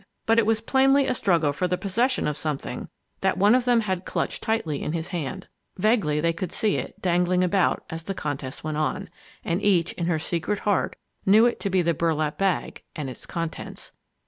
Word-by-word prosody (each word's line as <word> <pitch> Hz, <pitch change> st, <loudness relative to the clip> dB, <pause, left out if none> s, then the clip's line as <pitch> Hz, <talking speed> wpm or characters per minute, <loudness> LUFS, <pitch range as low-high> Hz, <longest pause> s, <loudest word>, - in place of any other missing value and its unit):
But 225 Hz, +1 st, +4 dB
it 220 Hz, -, +2 dB
was 220 Hz, -1 st, +2 dB
plainly 270 Hz, +3 st, +4 dB
a 255 Hz, -, +1 dB
struggle 170 Hz, -10 st, +2 dB
for 180 Hz, +5 st, -1 dB
the 180 Hz, 0 st, 0 dB
possession 235 Hz, +8 st, 0 dB
of 150 Hz, -, -1 dB
something 150 Hz, -2 st, -4 dB, 0.3 s
that -, -, +1 dB
one 205 Hz, +3 st, +5 dB
of 250 Hz, -1 st, +3 dB
them 240 Hz, -2 st, +4 dB
had 190 Hz, -4 st, -2 dB
clutched -, -, -2 dB
tightly 165 Hz, -10 st, -1 dB
in 155 Hz, -, -2 dB
his 165 Hz, +1 st, -3 dB
hand. 175 Hz, +2 st, -4 dB, 0.3 s
Vaguely 190 Hz, -7 st, +2 dB
they 165 Hz, +2 st, +1 dB
could 175 Hz, +1 st, -4 dB
see 215 Hz, -3 st, +1 dB
it, -, -, -6 dB
dangling 180 Hz, 0 st, +2 dB
about, 180 Hz, 0 st, +2 dB
as 165 Hz, 0 st, -7 dB
the 195 Hz, -, -3 dB
contest 140 Hz, -4 st, -4 dB
went 155 Hz, -1 st, -3 dB
on. 165 Hz, +4 st, -2 dB, 0.3 s
And 170 Hz, +4 st, 0 dB
each, 180 Hz, -5 st, +2 dB
in 170 Hz, -, -3 dB
her 175 Hz, -2 st, +2 dB
secret 175 Hz, +5 st, -2 dB
heart, 205 Hz, -2 st, +1 dB, 0.3 s
knew 215 Hz, +4 st, +6 dB
it 240 Hz, -, +1 dB
to 200 Hz, -, -2 dB
be 185 Hz, -1 st, +2 dB
the 170 Hz, 0 st, +2 dB
burlap 155 Hz, -1 st, 0 dB
bag 195 Hz, -2 st, 0 dB
and 145 Hz, -4 st, -4 dB
its -, -, -11 dB
contents! 165 Hz, -2 st, -5 dB
180 Hz, 205 wpm, -25 LUFS, 160-210 Hz, 0.3 s, knew